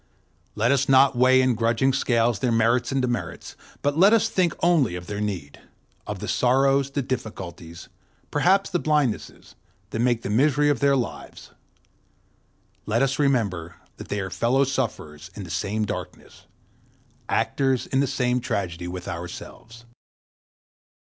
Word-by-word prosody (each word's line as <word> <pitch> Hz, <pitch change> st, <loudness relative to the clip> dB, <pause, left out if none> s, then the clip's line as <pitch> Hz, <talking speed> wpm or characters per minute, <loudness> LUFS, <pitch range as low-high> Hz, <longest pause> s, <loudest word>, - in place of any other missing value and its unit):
Let 115 Hz, +4 st, +2 dB
us 135 Hz, -1 st, +1 dB
not 135 Hz, 0 st, +5 dB
weigh 130 Hz, +1 st, +5 dB
in 130 Hz, -1 st, +2 dB
grudging 115 Hz, +4 st, +1 dB
scales 120 Hz, -4 st, +1 dB
their 120 Hz, +3 st, 0 dB
merits 115 Hz, +3 st, +2 dB
and 135 Hz, -1 st, 0 dB
demerits, 120 Hz, -1 st, -4 dB, 0.3 s
but 145 Hz, 0 st, +1 dB
let 200 Hz, +4 st, +6 dB
us 225 Hz, 0 st, +3 dB
think 180 Hz, -6 st, +1 dB
only 155 Hz, -, +3 dB
of 90 Hz, 0 st, -7 dB
their 105 Hz, +2 st, -5 dB
need—of 90 Hz, -9 st, -7 dB
the -, -, -6 dB
sorrows, 135 Hz, +2 st, +2 dB
the 140 Hz, 0 st, -2 dB
difficulties, 90 Hz, -9 st, -6 dB, 0.4 s
perhaps 190 Hz, +7 st, +2 dB
the 175 Hz, -, 0 dB
blindnesses, 150 Hz, -8 st, -1 dB, 0.4 s
that 115 Hz, -, -3 dB
make 120 Hz, -1 st, +1 dB
the 100 Hz, -, -3 dB
misery 145 Hz, +5 st, +3 dB
of 140 Hz, -, -1 dB
their 140 Hz, 0 st, +3 dB
lives; 125 Hz, -3 st, -5 dB, 1.4 s
let 115 Hz, +5 st, +1 dB
us 135 Hz, +1 st, -1 dB
remember 100 Hz, -, 0 dB, 0.2 s
that -, -, -9 dB
they 105 Hz, -, -3 dB
are 95 Hz, -1 st, -4 dB
fellow 130 Hz, +4 st, +2 dB
sufferers 115 Hz, -, -4 dB
in 105 Hz, -, -7 dB
the 85 Hz, -, -9 dB
same 105 Hz, +5 st, -1 dB
darkness, -, -, -8 dB, 0.8 s
actors 135 Hz, -2 st, 0 dB
in 130 Hz, -, -1 dB
the 140 Hz, -, +2 dB
same 125 Hz, -2 st, 0 dB
tragedy 90 Hz, -7 st, -3 dB
with 90 Hz, 0 st, -7 dB
ourselves. 115 Hz, +7 st, -8 dB
125 Hz, 145 wpm, -24 LUFS, 105-135 Hz, 1.4 s, let